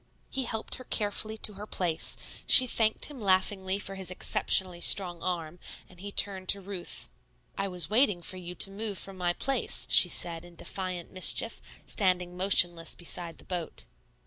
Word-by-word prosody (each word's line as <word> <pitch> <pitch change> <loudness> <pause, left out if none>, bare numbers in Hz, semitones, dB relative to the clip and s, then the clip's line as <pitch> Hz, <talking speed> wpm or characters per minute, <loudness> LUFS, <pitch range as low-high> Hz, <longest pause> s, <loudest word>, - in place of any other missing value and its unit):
He 265 -1 -3
helped 220 -2 -5
her 255 - -11
carefully 215 -1 -2
to 215 - -1
her 205 +2 -10
place; 170 -5 +1 0.3
she 255 - +9
thanked 220 -3 0
him 285 -5 -11
laughingly 190 0 0
for 195 -1 -7
his 190 -2 -4
exceptionally 185 -1 +1
strong 175 -3 +4
arm, 175 -2 -5 0.3
and 180 - -19
he 200 +2 -8
turned 190 -2 0
to 200 - +4
Ruth. 190 - -7 0.5
"I 195 - -3
was 180 -4 +1
waiting 210 -6 +1
for 185 - -5
you 180 -1 -8
to 195 - -1
move 205 0 -5
from 195 - -7
my 175 -1 -2
place," 270 +8 -1
she - - +5
said 165 -1 -3
in 175 -1 -16
defiant 185 -1 -6
mischief, 185 +5 +3 0.2
standing 180 -3 0
motionless 175 -3 +5
beside 170 -1 -5
the - - -15
boat. 170 - -7
185 Hz, 170 wpm, -28 LUFS, 175-205 Hz, 0.5 s, she